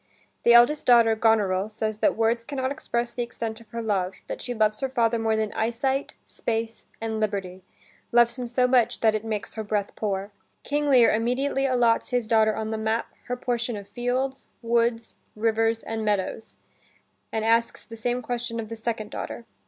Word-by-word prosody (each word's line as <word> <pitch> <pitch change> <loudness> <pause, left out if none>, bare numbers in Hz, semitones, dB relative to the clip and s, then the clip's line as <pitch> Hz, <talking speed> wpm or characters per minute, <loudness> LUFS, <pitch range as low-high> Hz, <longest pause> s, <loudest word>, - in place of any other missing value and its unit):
The 235 - +6
eldest 240 +6 +5
daughter, 230 -2 +6
Goneril, 210 -3 +2
says 215 0 -3
that - - +2
words 230 +1 +1
can 280 - -7
not 260 0 -1
express 240 -3 -2
the 245 - -4
extent 230 -1 -5
of 230 - -17
her 230 0 -5
love, 190 -4 -1
that - - -6
she 245 - -4
loves 215 -1 +2
her 270 - -1
father 235 -2 +1
more 220 0 +1
than 220 -1 -1
eyesight, 265 +5 -1
space, 225 -1 -4
and 220 -1 -3
liberty, 195 -3 -2 0.5
loves 235 0 +4
him 250 -2 -4
so 250 +1 +2
much 245 -2 +2
that 220 -1 +4
it 215 0 -2
"makes 215 -2 -4
her 220 - -4
breath 205 -1 -2
poor." 200 -1 -2 0.3
King 295 +1 -1
Lear 250 -4 +6
immediately 265 +5 0
allots 240 -3 +2
his 245 -3 0
daughter 220 -1 +3
on 220 0 -3
the 220 - -2
map, 220 +1 -1 0.2
her 250 0 -2
portion 240 -2 -2
of 200 -1 -9
fields, 250 +5 -2 0.2
woods, 230 0 0 0.2
rivers, 225 +1 +1
and 225 0 -4
meadows, 210 +1 -2 0.7
and 220 0 -1
asks 230 +1 +1
the 230 - -10
same 245 +2 -2
question 240 -1 -3
of 220 -2 -5
the 230 - -5
second 220 -1 -4
daughter. 235 - -6
230 Hz, 190 wpm, -25 LUFS, 220-240 Hz, 0.7 s, The